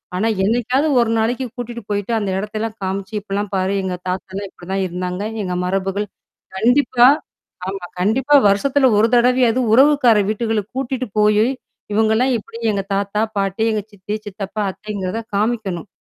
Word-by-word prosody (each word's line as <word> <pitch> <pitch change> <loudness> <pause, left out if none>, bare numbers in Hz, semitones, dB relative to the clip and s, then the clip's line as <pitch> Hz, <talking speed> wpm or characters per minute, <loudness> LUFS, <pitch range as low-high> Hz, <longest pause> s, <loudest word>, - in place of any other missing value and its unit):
ஆனா, 210 +5 +1 0.2
என்னைக்காவது 245 +6 +1
ஒரு 225 - +1
நாளைக்கு 245 +4 0
கூட்டிட்டு 240 -1 -6
போயிட்டு 205 +2 -2
அந்த 205 -2 -2
இடத்தல்லாம் 215 +2 -4
காமிச்சு 190 +2 -3
இப்பிட்லாம் 205 0 -4
பாரு. 190 +1 0
எங்க 185 -1 -2
தாத்தாலாம் 190 +2 -4
இப்பிடிதான் 190 +2 -4
இருந்தாங்க. 180 +2 -4 0.2
எங்க 180 -1 -3
மரபுகள். 195 +2 -1 0.5
கண்டிப்பா. 245 +1 +4 0.6
ஆமா. 195 -2 -5
கண்டிப்பா 255 +10 +2
வருஷத்துல 265 +7 +3
1 225 - +5
தடவையாவது 250 0 +3
உறவுக்கார 265 -3 +5
வீட்டுகளுக்கு 220 -1 -1
கூட்டிட்டு 260 -1 -2
போயி 210 +1 +4 0.5
இவுங்கலாம் 220 +4 +2
எப்பிடி 230 +1 -10
எங்க 200 -1 -1
தாத்தா, 200 +1 0
பாட்டி, 195 +2 0
எங்க 215 -1 0
சித்தி, 205 +1 -7
சித்தப்பா, 205 +1 -5
அத்தைங்கிறத 205 +1 -4 0.2
காமிக்கணும். 210 -4 -1
210 Hz, 140 wpm, -19 LUFS, 195-240 Hz, 0.6 s, 1